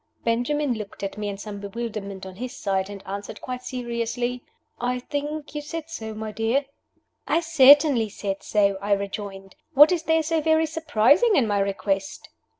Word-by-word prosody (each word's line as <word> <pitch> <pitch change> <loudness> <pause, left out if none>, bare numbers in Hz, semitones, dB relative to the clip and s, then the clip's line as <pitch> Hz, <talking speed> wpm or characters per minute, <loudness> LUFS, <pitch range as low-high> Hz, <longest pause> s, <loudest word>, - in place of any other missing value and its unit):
Benjamin 250 +4 +1
looked 210 -3 -7
at 195 - -3
me 210 0 -3
in 200 - -5
some 205 0 -7
bewilderment 200 -2 -5
on 185 -1 -10
his 250 +2 -6
side, 190 -1 -1
and 200 -1 -9
answered, 200 +1 -6
quite 250 -1 -5
seriously, 240 0 -3 0.4
"I 250 +1 0
think 295 +4 -4
you 300 - -3
said 325 +2 -6
so, 220 -8 -6
my 215 0 -5
dear." 225 +6 0 0.6
"I - - +3
certainly 285 -6 +6
said 195 -1 -4
so," 200 -2 +1
I 205 0 +1
rejoined. 195 -1 -5 0.2
"What 295 +5 +9
is 350 -3 +1
there 320 0 +2
so 320 0 0
very 315 +1 +3
surprising 320 - +3
in 265 - +4
my 205 -2 +1
request?" 195 +6 -2
235 Hz, 170 wpm, -24 LUFS, 200-295 Hz, 0.6 s, What